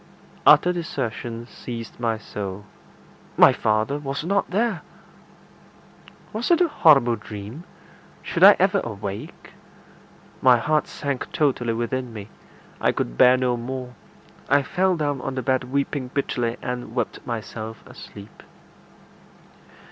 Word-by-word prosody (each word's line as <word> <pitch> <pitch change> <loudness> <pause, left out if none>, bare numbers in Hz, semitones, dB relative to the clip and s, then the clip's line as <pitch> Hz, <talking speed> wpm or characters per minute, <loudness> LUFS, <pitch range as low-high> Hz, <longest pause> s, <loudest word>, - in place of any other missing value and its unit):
Utter 180 - +7
desertion 120 -8 -4
seized 115 -2 -8
my 115 -2 0
soul 100 -2 -6 0.7
my - - +8
father 110 +7 0
was 140 0 -4
not 200 +3 0
there! 210 -1 0 1.5
Was 220 +3 -2
it 345 - +5
a 355 - +4
horrible 135 - +5
dream? 105 - -9 0.6
Should - - -1
I - - +10
ever - - +3
awake? 100 -3 -7 0.9
My 125 -2 +6
heart 150 +5 +1
sank 140 -3 -4
totally 125 -6 +1
within 120 +2 -3
me. 105 -1 -8 0.5
I - - +3
could - - -3
bear 125 - +6
no 125 -1 +1
more. 125 +1 -6 0.6
I 145 0 +4
fell 185 +6 +1
down 145 -4 -1
on 130 - -4
the 130 - -3
bed 130 +1 +1
weeping 140 0 -2
bitterly, 120 -3 -2
and 125 -2 -5
wept 120 -4 -3
myself 110 -1 -6
asleep. 100 +1 -13
125 Hz, 125 wpm, -23 LUFS, 115-145 Hz, 1.5 s, I